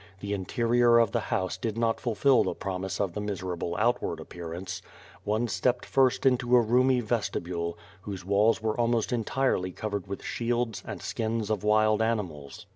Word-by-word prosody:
The 100 +1 -3
interior 115 +4 +3
of 115 -3 +4
the - - +1
house 95 0 -1
did 110 +2 -3
not 115 -1 +1
fulfil 120 +2 +3
the - - -2
promise 95 0 -4
of 95 -4 -1
the 105 - -3
miserable 90 -4 -3
outward 115 -7 0
appearance. 85 +3 -7 0.4
One 110 +3 0
stepped 125 +2 0
first 135 0 +2
into 125 -1 +3
a - - +8
roomy 125 +2 +3
vestibule, 85 -7 -2 0.2
whose 95 -2 -7
walls 105 +3 +3
were 110 -1 0
almost 120 0 +1
entirely 115 -5 0
covered 100 -1 -4
with 100 - -6
shields 120 -2 -1
and - - -6
skins 110 -1 -2
of 105 -2 -1
wild 110 0 +3
animals. 90 -12 -3
110 Hz, 165 wpm, -28 LUFS, 95-120 Hz, 0.4 s, a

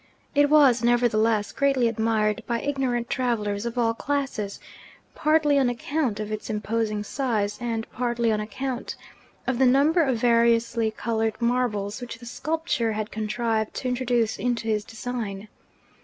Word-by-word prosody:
It 290 0 +4
was 275 -6 +5
nevertheless 230 -3 +2
greatly 275 -4 +2
admired 220 -2 +1
by 235 -1 0
ignorant 255 -4 -1
travellers 225 -5 -1
of 235 +1 -6
all 230 -2 +2
classes; 260 -6 -3 0.5
partly 305 -2 +3
on 260 -2 +3
account 245 -1 -2
of 215 0 -4
its 215 +1 -5
imposing 215 0 -1
size, 210 -4 -1
and 230 -2 -2
partly 240 -2 0
on 215 - +1
account 250 +4 -4 0.5
of 260 -2 -1
the 265 - +5
number 290 +7 +4
of 265 -6 +1
variously 230 -1 +3
coloured 220 0 -2
marbles 235 -4 0
which 240 -1 -6
the 240 - -13
sculptor 275 -3 -1
had 215 0 -4
contrived 220 0 -1
to 255 - -3
introduce 245 -3 0
into 240 -2 -1
his 215 -1 +1
design. 220 -3 -5
235 Hz, 145 wpm, -25 LUFS, 220-255 Hz, 0.5 s, was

